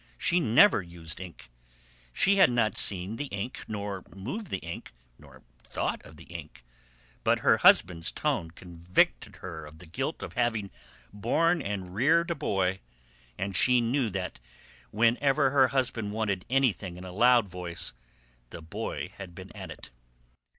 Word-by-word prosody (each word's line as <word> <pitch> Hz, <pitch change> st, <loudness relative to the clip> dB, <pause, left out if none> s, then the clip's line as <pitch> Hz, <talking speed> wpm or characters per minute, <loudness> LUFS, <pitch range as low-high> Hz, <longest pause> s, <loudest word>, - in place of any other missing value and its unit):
She 175 Hz, +1 st, +2 dB
never 130 Hz, -, +5 dB
used 85 Hz, -2 st, -6 dB
ink. 85 Hz, -10 st, -11 dB, 0.6 s
She 200 Hz, -, +2 dB
had 190 Hz, -, +7 dB
not 120 Hz, -3 st, +1 dB
seen 95 Hz, +3 st, +3 dB
the 145 Hz, -, -3 dB
ink, 100 Hz, +2 st, -5 dB
nor 100 Hz, -3 st, -4 dB
moved 135 Hz, -, -5 dB
the 95 Hz, -, -2 dB
ink, 85 Hz, -7 st, -8 dB, 0.3 s
nor -, -, -17 dB, 0.3 s
thought -, -, -2 dB
of 80 Hz, -, -14 dB
the 85 Hz, -, -12 dB
ink, 80 Hz, -7 st, -10 dB, 0.6 s
but -, -, +2 dB
her -, -, +5 dB
husband's 85 Hz, -2 st, +4 dB
tone 130 Hz, -, -1 dB
convicted 85 Hz, +1 st, -1 dB
her 85 Hz, -4 st, -8 dB
of 75 Hz, +1 st, -12 dB
the 90 Hz, -, -13 dB
guilt 80 Hz, -, -4 dB
of -, -, -7 dB
having 115 Hz, -5 st, -1 dB, 0.4 s
borne 160 Hz, -, +1 dB
and 95 Hz, -5 st, -4 dB
reared 165 Hz, -, +3 dB
a -, -, 0 dB
boy, 95 Hz, -9 st, 0 dB, 0.6 s
and 100 Hz, -1 st, -3 dB
she 125 Hz, +8 st, +4 dB
knew 120 Hz, +1 st, +1 dB
that 95 Hz, -8 st, -4 dB, 0.5 s
whenever 135 Hz, +5 st, +2 dB
her 135 Hz, -2 st, +5 dB
husband 120 Hz, -5 st, -1 dB
wanted 100 Hz, -4 st, -1 dB
anything 115 Hz, -9 st, +1 dB
in 90 Hz, -, -9 dB
a 90 Hz, -, -8 dB
loud 120 Hz, +1 st, +5 dB
voice 85 Hz, -6 st, -5 dB, 0.6 s
the 85 Hz, -, -9 dB
boy 80 Hz, -, -5 dB
had 90 Hz, -3 st, -9 dB
been -, -, -11 dB
at -, -, -8 dB
it. -, -, -11 dB
100 Hz, 155 wpm, -28 LUFS, 90-125 Hz, 0.6 s, had